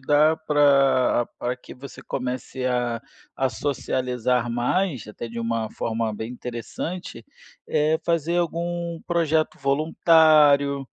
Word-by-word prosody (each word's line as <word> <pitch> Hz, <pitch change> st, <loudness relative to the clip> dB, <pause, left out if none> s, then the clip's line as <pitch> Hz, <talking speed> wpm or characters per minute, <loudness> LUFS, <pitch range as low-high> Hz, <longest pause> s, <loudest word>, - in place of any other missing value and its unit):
dar 150 Hz, +3 st, +3 dB
para 140 Hz, -4 st, +4 dB
para 125 Hz, +1 st, -2 dB
que -, -, -13 dB
você 135 Hz, +2 st, -11 dB
comece 125 Hz, 0 st, -4 dB
a 120 Hz, -2 st, -1 dB, 0.4 s
a 135 Hz, -1 st, +1 dB
socializar 125 Hz, -1 st, -1 dB
mais, 125 Hz, -, -1 dB
até 110 Hz, +2 st, -7 dB
de 115 Hz, -, -7 dB
uma 115 Hz, -1 st, -2 dB
forma 115 Hz, -1 st, -2 dB
bem 110 Hz, +3 st, -6 dB
interessante, 125 Hz, +4 st, -6 dB, 0.4 s
é 155 Hz, +2 st, +1 dB
fazer 170 Hz, 0 st, 0 dB
algum 170 Hz, 0 st, -2 dB
projeto 160 Hz, -2 st, +1 dB
voluntário, 145 Hz, -1 st, +4 dB
135 Hz, 115 wpm, -24 LUFS, 120-160 Hz, 0.4 s, para